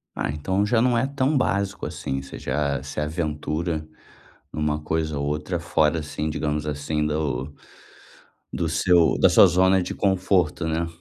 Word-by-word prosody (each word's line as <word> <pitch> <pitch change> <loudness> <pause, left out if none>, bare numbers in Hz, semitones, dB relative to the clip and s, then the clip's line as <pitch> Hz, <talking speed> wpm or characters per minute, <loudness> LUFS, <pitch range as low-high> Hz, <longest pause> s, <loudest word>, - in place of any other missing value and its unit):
Ah, - - -2
então 95 +7 -1
já 115 +1 +2
não 125 -1 +3
é 125 - +2
tão 140 +1 0
básico, 100 -6 -1
assim, 65 0 -4
você 65 - -10
já 70 0 -1
se 75 +1 -6
aventura 80 +1 -2 0.6
numa 75 0 -1
coisa 80 -1 -2
ou 70 - -2
outra 75 +4 -2
fora, 80 -1 +1
assim, 75 +1 -4
digamos 75 0 -2
assim, 75 +1 -2
do 75 -2 -2 1.0
do 80 -2 -1
seu 85 0 +3
da - - +6
sua - - +7
zona 95 +1 +3
de - - -4
conforto, 95 -4 +1
né? 80 +1 -1
80 Hz, 160 wpm, -24 LUFS, 75-90 Hz, 1.0 s, sua